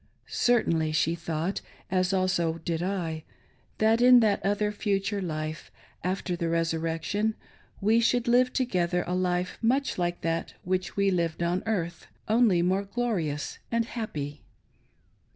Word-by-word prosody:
Certainly, 165 -10 +2
she 155 +1 +2
thought, 165 +2 -3 0.3
as 185 0 +2
also 185 -3 +1
did 165 -1 -1
I, 175 -4 -2 0.5
that 220 +2 +3
in 250 0 +8
that 210 -4 +2
other, 205 +2 +1
future 200 0 -1
life, 155 -3 -4 0.3
after 185 0 -1
the 170 -1 -2
resurrection, 165 +5 0 0.5
we 220 +3 +4
should 245 +1 +2
live 250 +1 +4
together 180 -8 0
a 180 - -2
life 180 0 -1
much 260 0 +1
like 175 0 -1
that 165 0 -2
which 185 +1 -2
we 200 -1 +3
lived 170 -2 0
on 175 +2 0
earth, 175 -6 -2 0.2
only 215 -6 +4
more 190 +3 +1
glorious 195 -10 -2
and 230 0 +1
happy. 150 -12 -5
185 Hz, 135 wpm, -27 LUFS, 165-215 Hz, 0.5 s, in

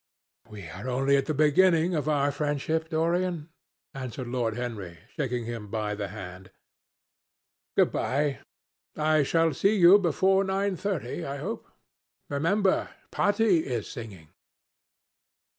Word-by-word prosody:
"We 100 -5 -9
are 100 +10 -7
only 135 +2 +2
at 135 -1 +1
the 155 - 0
beginning 165 +3 +4
of 155 -1 -1
our 145 -1 +2
friendship, 150 +2 -2
Dorian," 170 0 0 0.4
answered 130 -1 -6
Lord 120 -3 -1
Henry, 105 -9 -5 0.2
shaking 125 -4 -2
him 115 -2 -6
by 105 0 -2
the 105 -1 -4
hand. 90 -2 -9 1.3
"Good - - +4
bye. 140 -1 -1 0.6
I 155 0 +3
shall 165 +2 +2
see 200 +2 +2
you 185 +1 +7
before 190 +1 +2
nine 195 0 0
thirty, 180 - -3
I 140 +1 -4
hope. - - -5 0.6
Remember, 185 +7 +1 0.2
Patti 205 -3 +3
is 120 -8 -3
singing." 100 - -9
145 Hz, 125 wpm, -27 LUFS, 120-170 Hz, 1.3 s, you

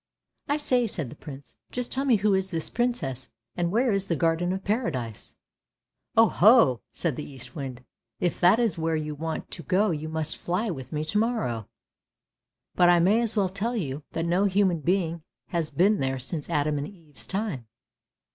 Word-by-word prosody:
" - - -54
I 290 - +1
say," 255 -5 +2
said 160 - -3
the - - -9
Prince, 140 -2 -11
" - - -42
just 250 -1 -3
tell 270 +1 0
me 255 -4 +5
who 210 0 +2
is 190 0 +1
this 165 -4 -2
Princess, 170 - -2 0.3
and 175 -1 0
where 240 +4 +2
is 195 -1 0
the 170 - +1
Garden 165 +2 +1
of 190 +1 -3
Paradise? 155 - -3 0.3
" - - -64
" - - -34
Oh 225 0 +8
ho! 205 - +5
" - - -56
said 165 -7 -2
the 150 - -5
Eastwind, 130 -1 -8 0.2
" - - -59
if - - -12
that 180 +5 +6
is 225 -8 0
where 160 0 0
you 155 -1 -3
want 160 +2 -5
to 170 - -6
go 185 +6 +2
you 155 0 -3
must 160 -1 -1
fly 190 +5 -1
with 130 -5 -7
me 150 0 -2
to 205 +7 0
morrow. 215 - -1 1.1
But 175 -1 +5
I 175 - +6
may 200 +7 +4
as 230 -1 +2
well 200 -3 +2
tell 205 +6 -2
you 150 - -3
that 165 - -1
no 180 +4 +2
human 190 -3 +2
being 170 0 0 0.3
has 165 -3 -1
been 200 +5 +3
there 135 0 -1
since 145 +5 -2
Adam 150 -2 +1
and 145 - -4
Eve's 165 -7 -11
time. 190 - -3
170 Hz, 210 wpm, -26 LUFS, 150-210 Hz, 1.1 s, Oh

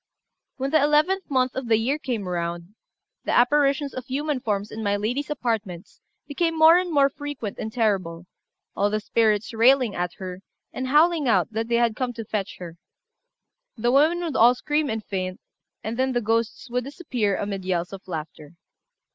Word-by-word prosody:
When 270 +1 -2
the 315 -1 +4
eleventh 310 +7 +2
month 255 -2 +1
of 260 -2 -4
the 225 -1 +4
year 265 +7 0
came 235 -9 -3
round, 170 +1 -4 0.5
the - - -1
apparitions 280 +2 +3
of 255 -1 -7
human 290 +1 -1
forms 210 -3 -2
in 220 - -6
my 205 -1 +1
lady's 245 +8 -2
apartments 225 - -4 0.3
became 330 +3 -1
more 320 +1 +8
and 360 -1 -3
more 280 -3 +5
frequent 280 -6 -6
and 220 - -4
terrible, 190 -7 -1 0.5
all 205 - +2
the 215 +1 -1
spirits 215 0 +1
railing 245 0 +4
at 175 0 -3
her, 185 -1 -8 0.3
and 260 - -3
howling 305 +1 +3
out 230 - +2
that 225 +1 -2
they 235 - +1
had 235 -2 +2
come 250 0 -2
to 225 -1 -7
fetch 205 -2 -4
her. 170 -2 -9 1.0
The 240 +2 +1
women 310 +6 +4
would 325 -5 -3
all 240 +2 +6
scream 295 +2 -1
and 220 -1 -3
faint; 185 -2 -4 0.4
and 225 +2 -4
then 260 0 +1
the 240 - +1
ghosts 230 +3 -1
would 250 +1 0
disappear 250 - -2
amid 200 -2 -4
yells 180 0 -2
of 195 -1 -10
laughter. 155 -2 -7
235 Hz, 180 wpm, -24 LUFS, 200-280 Hz, 1.0 s, more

